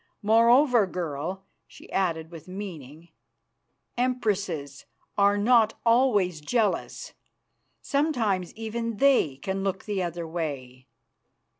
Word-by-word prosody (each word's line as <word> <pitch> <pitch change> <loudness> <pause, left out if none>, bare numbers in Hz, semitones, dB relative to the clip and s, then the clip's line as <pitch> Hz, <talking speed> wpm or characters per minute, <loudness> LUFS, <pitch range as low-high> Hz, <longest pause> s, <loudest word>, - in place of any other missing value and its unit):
Moreover, 235 +1 +5
girl," 180 +2 -4 0.2
she - - -16
added 165 -4 -1
with 165 0 -11
meaning, 170 -5 -9 0.9
"empresses 200 - -2 0.3
are 200 0 +3
not 225 +1 +4
always 215 -9 +3
jealous; 215 +5 -1 0.7
sometimes 240 - 0
even 225 0 -4
they 265 - +3
can 195 +6 -3
look 195 -1 -3
the 205 -3 -2
other 170 -1 -4
way. 140 -6 -5
195 Hz, 100 wpm, -26 LUFS, 165-230 Hz, 0.9 s, Moreover